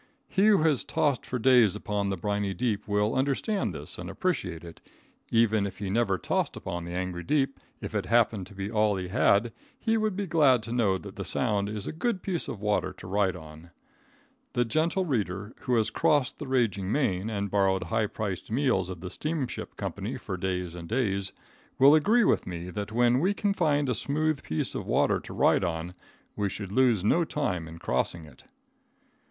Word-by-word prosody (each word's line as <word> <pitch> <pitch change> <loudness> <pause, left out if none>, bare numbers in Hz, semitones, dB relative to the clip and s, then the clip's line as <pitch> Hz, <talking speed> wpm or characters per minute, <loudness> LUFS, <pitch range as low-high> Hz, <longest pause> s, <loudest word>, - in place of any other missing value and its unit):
He 195 +3 +2
who 200 -7 +5
has 155 -6 +3
tossed 145 -4 0
for 125 - -2
days 120 -4 +5
upon 105 -1 -2
the 95 - -2
briny 100 +1 -1
deep, 105 0 -1
will 105 +1 +1
understand 140 +10 0
this - - -6
and - - -6
appreciate 95 - -2
it; 85 -1 -11 0.5
even 110 -3 +3
if 95 - -9
he 100 -2 -4
never 105 -3 +2
tossed - - -1
upon 85 -1 -5
the 85 - -6
angry 90 -1 -3
deep, 140 +3 0 0.2
if - - -6
it - - -1
happened 115 -5 +2
to 100 - -14
be 100 +2 -4
all 105 -2 +2
he 90 -1 -4
had, 110 +1 +3 0.3
he 225 -1 +1
will 215 0 +1
be 200 0 -3
glad 145 - +4
to 115 - -5
know 110 -6 +2
that 95 +1 -11
the 100 - -3
Sound 100 +1 0
is 105 -1 -5
a - - -3
good 185 +3 -2
piece 180 -4 -1
of 105 - -5
water 105 0 0
to - - -13
ride 95 0 +1
on. 80 0 -12 0.8
The 120 - +2
gentle 165 - +1
reader 105 - -2
who 125 - 0
has 110 -1 +1
crossed 145 +2 +1
the 150 - -6
raging 110 -7 0
main 110 -8 0
and 100 -3 -3
borrowed 95 -2 +2
high 110 -1 0
priced 100 -4 -4
meals 115 -7 +1
of 90 -3 -7
the 90 - -5
steamship 150 -5 -4
company - - -4
for - - -5
days 90 -2 -3
and 85 -1 -8
days, 100 -5 0 0.5
will 140 +2 +7
agree 210 +11 +4
with - - +2
me 90 0 -5
that 105 +3 -5
when 120 +2 +3
we 190 +7 +1
can 205 -1 0
find 145 -6 +1
a 125 - +1
smooth 150 +4 -1
piece 80 - +1
of - - -5
water - - +2
to - - -11
ride - - +3
on 85 +1 -3 0.4
we 100 -1 -1
should 100 0 -6
lose 120 -4 +3
no 170 +11 +3
time 100 - -2
in 80 +1 -10
crossing 80 +3 -2
it. 75 - -17
105 Hz, 200 wpm, -28 LUFS, 95-135 Hz, 0.8 s, will